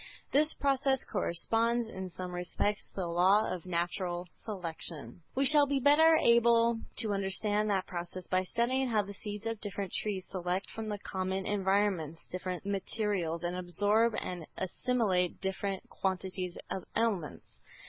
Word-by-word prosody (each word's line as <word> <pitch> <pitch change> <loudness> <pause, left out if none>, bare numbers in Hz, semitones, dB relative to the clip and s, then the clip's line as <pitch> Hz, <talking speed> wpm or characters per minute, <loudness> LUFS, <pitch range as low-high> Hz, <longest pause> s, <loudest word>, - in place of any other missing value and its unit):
This 305 +2 +3
process 270 -1 +1
corresponds 230 +7 0
in 190 -4 -6
some 180 0 -6
respects 180 +3 -1
to - - -25
the 190 - -2
law 185 +5 +4
of 185 -1 -7
"natural 175 0 -2
selection." 165 - -6
We 270 +1 +2
shall 290 +1 +7
be 280 -1 +1
better 310 +4 +6
able 235 -3 +4 0.2
to 220 -3 +1
understand 205 +2 0
that 195 -2 +1
process 175 +1 -6
by 185 0 +1
studying 255 +6 +1
how 220 -3 +2
the 200 0 -8
seeds 205 +1 -7
of 225 -2 -3
different 200 -2 -4
trees 195 -3 -1
select 180 +1 -2
from 225 -1 -5
the 210 - -2
common 190 -1 -3
environments 190 -5 0
different 185 0 -4
materials, 195 -4 -1
and 175 +1 -1
absorb 205 +6 +2
and 175 -3 -5
assimilate 190 -3 0
different 195 0 -3
quantities 185 -1 -1
of 190 - -3
elements. 210 -9 -2
195 Hz, 150 wpm, -31 LUFS, 180-225 Hz, 0.2 s, shall